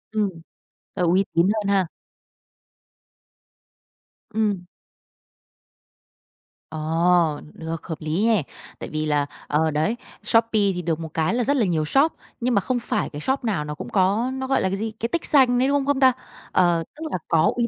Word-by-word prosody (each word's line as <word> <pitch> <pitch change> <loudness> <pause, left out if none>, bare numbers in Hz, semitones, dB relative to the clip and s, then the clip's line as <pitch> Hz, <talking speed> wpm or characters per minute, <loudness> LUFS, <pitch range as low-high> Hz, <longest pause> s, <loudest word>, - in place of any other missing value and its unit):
Ừm. 210 -2 +2 0.7
T - - -10
uy 195 +2 +3
tín 170 +2 +4
hơn 210 -2 -2
ha? 195 -3 +3 2.5
Ừm. 205 -5 0 2.1
Ờ, 160 0 +2
được, 160 -1 -6
hợp 160 - -4
lý 160 +7 0
nè, 220 -8 +3 0.4
tại - - -6
vì 155 0 -2
là, 145 -1 +1 0.2
ờ, 155 +1 +1
đấy, 160 +10 0 0.3
Shopee 230 0 +3 0.2
thì 180 - -3
được 165 -1 -1
một 160 -1 -6
cái 160 +5 +1
là 245 0 +1
rất 285 +4 +2
là 230 - +3
nhiều 160 -4 0
shop 275 - +3 0.3
nhưng 245 +1 0
mà 200 - +3
không 250 +4 -1
phải 235 - -2
cái 145 - -7
shop 265 - -1
nào 195 -10 -1
nó 150 0 -5
cũng - - -7
có 205 +6 +2
nó, 265 0 -4
gọi 270 - +2
là, 190 - +1
cái 195 - -2
gì, 220 +2 -3
cái 230 +2 -4
tích 340 - -2
xanh 250 -4 +4
đấy, 260 - +3
đúng 280 - +2
không 275 - -1
không 285 -1 +1
ta? 260 -1 +6 0.4
Ờ, 175 -2 +3
tức 315 - -8
là - - 0
có 160 0 +3
uy 240 -1 +1
195 Hz, 185 wpm, -23 LUFS, 160-240 Hz, 2.5 s, ta